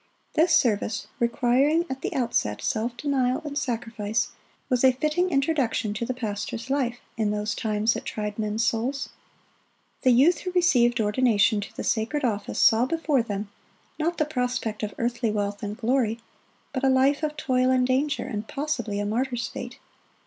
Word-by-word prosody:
This 325 +2 +3
service, 220 -7 +2
requiring 260 +7 +2
at 265 -3 -5
the - - -2
outset 230 - 0
self 235 +2 -1
denial 260 -3 +1
and 290 -1 -5
sacrifice, 225 -3 -2 0.4
was 250 -2 +1
a 260 -1 +6
fitting 305 +7 0
introduction 275 - 0
to 230 +2 -3
the 255 - -1
pastor's 225 +2 -4
life 250 -4 0 0.2
in 215 -2 +1
those 210 0 -1
times 215 +1 +1
that - - -5
tried 210 0 -4
men's 215 +2 0
souls. 245 +5 -1 0.9
The 260 - +3
youth 280 +8 +5
who 365 - -4
received 245 -10 +3
ordination 215 -1 +3
to 200 - -9
the - - -3
sacred 250 +6 0
office 210 -4 -2
saw 230 +3 +5
before 310 -4 +1
them, 205 -2 -4 0.5
not 335 +3 0
the 305 - +2
prospect 250 -6 -2
of 210 -1 -4
earthly 235 0 0
wealth 205 -1 -2
and 210 0 -4
glory, 235 -2 +1 0.5
but 260 -1 -3
a 270 - +4
life 265 +3 +3
of 305 -1 -2
toil 255 -3 +1
and 255 -1 +3
danger, 280 +3 +1
and 215 -1 -5
possibly 275 -8 -2
a 205 - -1
martyr's 245 +3 -1
fate. - - -7
245 Hz, 170 wpm, -25 LUFS, 220-275 Hz, 0.9 s, a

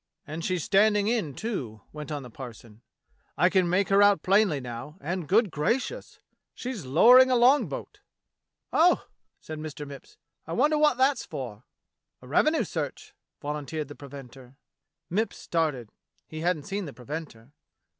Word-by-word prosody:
"And 155 +2 -6
she's 180 -3 -1
standing 205 +1 +3
in, 215 - -1
too," 130 - -4
went 150 0 -7
on 145 -2 -4
the 125 - -11
parson. 115 -3 -11 0.6
"I - - +4
can 185 -3 +3
make 185 +3 +1
her 195 +1 +5
out 205 -1 +5
plainly 195 -6 +3
now, 125 +5 -8
and, 175 -1 -4
good 210 +1 +3
gracious! 250 - -2 0.4
she's 235 - -6
lowering 250 - +7
a 255 - +3
long 255 +4 +5
boat!" - - -7 0.7
"Oh!" 345 +3 +4 0.4
said 155 -1 -7
Mr. 150 -1 -6
Mipps, 140 -1 -12 0.3
"I 165 - -4
wonder 295 - +3
wot 300 -3 +4
that's 265 0 +2
for.^" 120 -4 -7 0.6
"A - - -12
revenue 305 - +3
search," - - -5 0.3
volunteered 150 0 -4
the 145 - -9
preventer. 135 -2 -12 0.5
Mipps 215 +6 -1
started. 150 -9 -2 0.4
He 155 - -7
hadn't 165 -2 0
seen 200 +3 -4
the 145 - -8
preventer. 135 -2 -8
160 Hz, 155 wpm, -27 LUFS, 140-210 Hz, 0.7 s, lowering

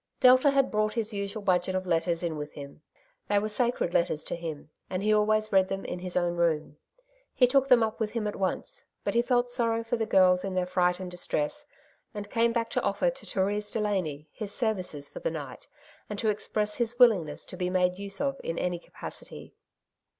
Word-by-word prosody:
Delta 255 +3 +7
had 275 -1 +2
brought 215 0 0
his 225 -1 -2
usual 200 +1 -4
budget 185 -1 +1
of 185 0 -1
letters 170 0 0
in 165 -2 -1
with 150 0 -6
him. 140 +1 -10 0.5
They 205 - +3
were 210 +1 +1
sacred 235 -5 0
letters 160 -2 +1
to - - -4
him, 160 -3 -7 0.2
and 185 +1 -2
he 215 0 +3
always 215 0 +2
read 190 -1 +4
them 195 0 -4
in 180 - -4
his 180 0 -3
own 175 -1 0
room. 155 -3 0 0.6
He 250 - +6
took 270 +2 +3
them 250 -3 +6
up 220 +1 -2
with 215 -2 -2
him 230 -3 -1
at 210 - -2
once, 190 -1 -2 0.2
but - - -1
he 235 - +4
felt 245 0 +1
sorrow 230 -2 0
for 230 +1 -1
the 225 -1 -1
girls 185 -3 +5
in 195 -1 -3
their 180 -1 +1
fright 180 0 +1
and 185 -1 -6
distress, 180 - -2 0.5
and 205 0 -6
came 235 0 +3
back 230 -1 -1
to - - 0
offer - - +1
to - - -12
Therese 205 +2 -1
Delany 185 -9 -2
his 215 -3 -5
services 185 - -1
for - - -9
the - - -1
night, - - -7 0.4
and 210 - -4
to 220 - +1
express 210 0 -1
his 240 0 -1
willingness 200 - +4
to - - -8
be 180 -1 -1
made 180 0 +1
use 200 -1 -4
of 275 -1 -1
in 165 - -3
any 180 -1 -1
capacity. - - -9
200 Hz, 215 wpm, -28 LUFS, 180-230 Hz, 0.6 s, Delta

